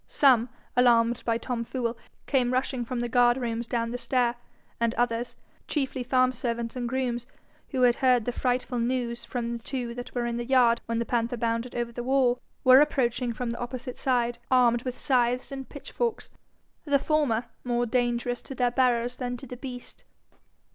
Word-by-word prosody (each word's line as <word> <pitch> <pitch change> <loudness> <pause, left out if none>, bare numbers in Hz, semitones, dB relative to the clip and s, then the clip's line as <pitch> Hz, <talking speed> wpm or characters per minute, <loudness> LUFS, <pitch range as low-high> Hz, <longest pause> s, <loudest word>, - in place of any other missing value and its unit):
Some, 250 -4 +4 0.3
alarmed 240 -1 +4
by 230 -1 +2
Tom 235 -1 -3
Fool, 235 -1 -2 0.3
came 250 -3 +1
rushing 255 -1 0
from 240 +1 -3
the 240 - -1
guard 240 +1 +4
rooms 235 -2 -3
down 230 -1 -1
the 245 - -4
stair, 245 -2 +1 0.5
and 230 0 +1
others, 240 0 -1 0.3
chiefly 270 -3 -1
farm 255 +1 +3
servants 235 -1 -3
and 240 -2 -2
grooms, 245 -2 -2 0.4
who 260 -3 0
had 240 -1 +5
heard 250 -4 +3
the 245 - 0
frightful 250 0 -1
news 240 0 -1
from 235 -1 -3
two 240 0 -4
that 245 +1 -8
were 240 -1 0
in 235 0 -2
the 240 - -2
yard 240 -2 +4
when 230 0 -1
the 235 - 0
panther 240 0 -1
bounded 230 +1 -2
over 240 -1 -2
the 240 - -5
wall, 250 -1 +2 0.2
were 255 +2 +8
approaching 250 -4 +1
from 235 +1 -3
the 235 - -5
opposite 250 +1 -5
side, 240 -2 0
armed 240 -2 +4
with 255 0 -5
scythes 250 -2 +1
and 270 -1 -6
pitchforks, 445 - -4 0.5
the 285 -2 +3
former 275 -6 +1 0.2
more 240 -1 0
dangerous 240 0 0
to 270 - -8
their 245 -1 +1
bearers 245 -1 +1
than 245 -1 -3
to 270 - -10
the 250 -1 -8
beast. 250 -1 -8
245 Hz, 180 wpm, -27 LUFS, 235-255 Hz, 0.5 s, were